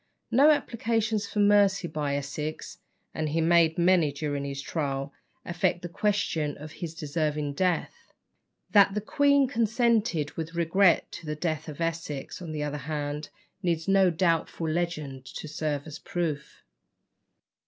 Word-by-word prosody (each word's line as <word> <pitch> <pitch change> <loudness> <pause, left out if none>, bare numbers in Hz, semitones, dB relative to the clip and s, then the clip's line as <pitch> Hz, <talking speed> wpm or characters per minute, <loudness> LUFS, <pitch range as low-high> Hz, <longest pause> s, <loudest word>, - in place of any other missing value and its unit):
No 275 +6 +6
applications 225 -6 0
for - - -8
mercy 200 -2 +4
by 150 -3 -2
Essex 150 +2 -5 0.3
(and 155 -1 -2
he 160 +3 0
made 165 -1 +4
many 175 -3 +4
during 145 -1 -3
his 140 0 -4
trial) 140 -2 -3 0.3
affect 175 0 0
the - - -3
question 170 -6 0
of 150 +1 -9
his 165 +1 -7
deserving 150 -2 -2
death. 185 - -1 0.6
That 200 -1 +6
the 210 - 0
queen 280 +4 +3
consented 225 - +1
with 165 +1 -6
regret 170 +2 +3
to 165 - -9
the 150 - -2
death 155 0 -3
of 150 - -9
Essex, 165 -3 -3
on 170 -3 -6
the 150 -1 -3
other 150 0 -3
hand, 150 0 -3 0.3
needs 170 -3 -1
no 195 -1 +5
doubtful 165 -1 0
legend 155 -5 -2
to - - -6
serve 150 -2 -3
as 155 -1 -8
proof. 165 -5 -4
165 Hz, 145 wpm, -27 LUFS, 150-195 Hz, 0.6 s, No